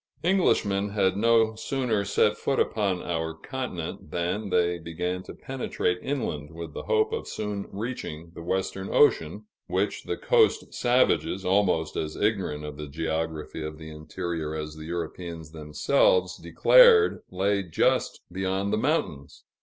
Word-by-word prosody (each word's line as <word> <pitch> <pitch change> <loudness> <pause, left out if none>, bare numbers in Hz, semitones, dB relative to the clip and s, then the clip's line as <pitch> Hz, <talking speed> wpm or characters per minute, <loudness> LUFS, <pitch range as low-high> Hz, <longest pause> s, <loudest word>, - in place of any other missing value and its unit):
Englishmen 105 - +2
had 95 -2 +1
no 115 +1 +3
sooner 115 -2 -1
set - - +2
foot - - -1
upon 100 -4 0
our 80 -1 -2
continent, 90 - -6
than 90 +6 -2
they 90 -1 +2
began 90 +2 -3
to - - -10
penetrate 125 -8 -2
inland 110 - -3
with 80 -1 -8
the - - -5
hope 440 0 +2
of 455 - -3
soon 105 -2 -4
reaching 95 -7 -5
the - - -9
Western 95 +2 -2
Ocean, 105 - +3 0.2
which - - -1
the - - -3
coast - - +2
savages, 120 -6 +2
almost 90 -4 +2
as 75 0 -3
ignorant 95 -8 -1
of 75 -1 -7
the 75 -1 -6
geography 80 +1 -3
of 75 0 -6
the 80 0 -9
interior 80 0 -4
as 75 0 -5
the 80 0 -9
Europeans 85 -1 -5
themselves, 450 - +2
declared 480 -3 +6
lay 100 +2 +1
just 85 -5 0
beyond 95 +2 -1
the - - +2
mountains. 110 - -2
95 Hz, 145 wpm, -26 LUFS, 80-110 Hz, 0.2 s, declared